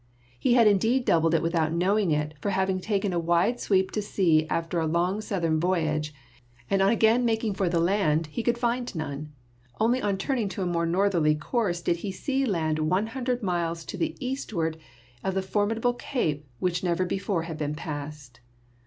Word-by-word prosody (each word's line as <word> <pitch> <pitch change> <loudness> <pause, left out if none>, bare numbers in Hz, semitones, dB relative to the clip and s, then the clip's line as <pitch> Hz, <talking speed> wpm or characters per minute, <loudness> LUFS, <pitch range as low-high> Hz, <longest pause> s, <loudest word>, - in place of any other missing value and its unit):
He 240 - +3
had 235 -2 +6
in 200 -2 +5
deed 245 +5 +1
doubled 165 0 +3
it 165 - +1
without 165 -2 +1
knowing 190 +3 +2
it, 150 0 0
for 205 - -1
having 190 -1 0
taken 200 -1 -1
a 175 - +1
wide 175 +8 +2
sweep 190 -2 +1
to 210 - -1
sea 165 -6 +2
after 165 +1 -1
a 160 - 0
long 175 +6 0
southern 170 -7 0
voyage, 155 -4 0 0.6
on 195 - +3
again 225 +4 +4
making 225 -2 0
for 190 -2 0
the 170 -1 +1
land 165 -3 +2
he 155 +10 -4
could 240 +1 +1
find 240 -1 -1
none; 150 -1 -5 0.5
only 240 +4 +2
on 200 -2 0
turning 225 0 -1
to 190 - -4
a - - -1
more 170 -1 0
northerly 170 -4 +2
course 175 +1 -1
did 170 - +1
he 195 +3 -4
see 270 +7 -1
land 160 -6 0
one 180 +7 +1
hundred 250 -2 -2
miles 170 -3 -1
to - - -6
the 330 - -2
eastward 205 - -3 0.4
of 190 0 -1
the 190 - 0
formidable 220 +5 0
cape 155 - -2
which 180 +4 -1
never 180 0 +1
before 190 -2 -1
had 165 -2 -6
been 150 0 -2
passed. 145 -5 -7
185 Hz, 190 wpm, -26 LUFS, 165-215 Hz, 0.6 s, had